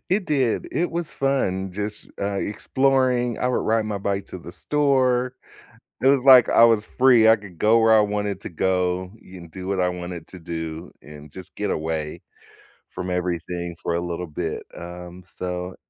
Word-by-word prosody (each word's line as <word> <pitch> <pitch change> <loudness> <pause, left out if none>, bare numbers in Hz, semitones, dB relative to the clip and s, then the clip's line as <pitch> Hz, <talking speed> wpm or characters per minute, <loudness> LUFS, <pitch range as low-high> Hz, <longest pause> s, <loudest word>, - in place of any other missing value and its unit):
It 190 0 +1
did 135 -6 0
It 175 - 0
was 170 -1 -4
fun 95 -9 -1
just, 105 +2 -5
uh, 100 0 -1
exploring. 125 +1 +1
I 125 - 0
would 125 - 0
ride 110 0 +1
my 105 -2 -3
bike 100 0 -2
to 90 - -8
the 85 0 -11
store. 130 - +1 0.7
It - - +3
was 135 -2 +4
like 130 -3 +8
I 115 - +7
was 115 -2 +3
free. 125 -4 +4
I 110 - +7
could 100 -5 -13
go 110 +5 +4
where 110 0 +5
I 110 - +6
wanted 105 -2 -2
to - - -6
go, 90 +1 -1
and 90 -2 -12
do 95 +2 -8
what 95 -1 -1
I 90 - +2
wanted 90 -1 -6
to 95 - -11
do, 80 0 -6
and 75 0 -13
just 95 +3 -11
get 105 -1 -2
away 80 -1 -3 0.7
from 90 0 -6
everything 85 -1 -3
for 85 - -1
a - - 0
little 85 0 -4
bit, 80 +1 -4
um, 90 +1 -9
so 90 0 -5
95 Hz, 185 wpm, -23 LUFS, 90-120 Hz, 0.7 s, like